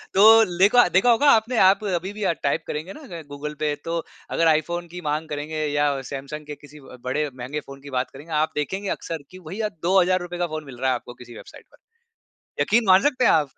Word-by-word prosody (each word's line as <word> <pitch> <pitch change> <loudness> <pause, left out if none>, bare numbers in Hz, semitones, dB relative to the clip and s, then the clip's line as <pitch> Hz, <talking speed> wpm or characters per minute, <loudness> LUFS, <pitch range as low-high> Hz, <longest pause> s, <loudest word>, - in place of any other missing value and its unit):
तो 195 - +5 0.4
लेखा 205 +4 +6
देखा 240 +6 +5
होगा 280 +5 +4
आपने 225 +2 +2
आप 195 +3 +4
अभी 190 0 -2
भी 210 -1 -6
अ, 180 - +2
टाइप 140 - 0
करेंगे 155 +6 -5
ना 185 - -9
गूगल 150 +1 -5
पे 150 -1 0
तो 165 0 -2 0.3
अगर 165 - +2
आईफोन 170 +2 +1
की 180 - -6
माँग 155 +1 -2
करेंगे 150 +1 -4
या 145 0 +1 0.2
सैमसंग 140 +2 -7
के 150 - -6
किसी 145 +1 -13
ब 130 -1 -13
बड़े 145 +4 -1
महँगे 130 +4 -5
फ़ोन 135 0 -11
की 140 - -11
बात 125 - -1
करेंगे 150 +4 -12
आप 155 +1 +1
देखेंगे 190 +7 -3
अक्सर 165 -3 -6
कि 185 - -11
भईया 210 +3 -2 0.2
₹2000 180 -1 +2
का 175 - 0
फ़ोन 155 -1 -5
मिल 120 - -11
रहा 130 - +1
है 130 - +2
आपको 120 0 -8
किसी 120 -1 -12
वेबसाइट - - -13
पर। - - -22 0.8
यक़ीन 230 +1 +3
मान 190 0 +6
सकते 255 -3 +1
हैं - - +6
आप? 150 -3 +2
160 Hz, 225 wpm, -23 LUFS, 145-190 Hz, 0.8 s, लेखा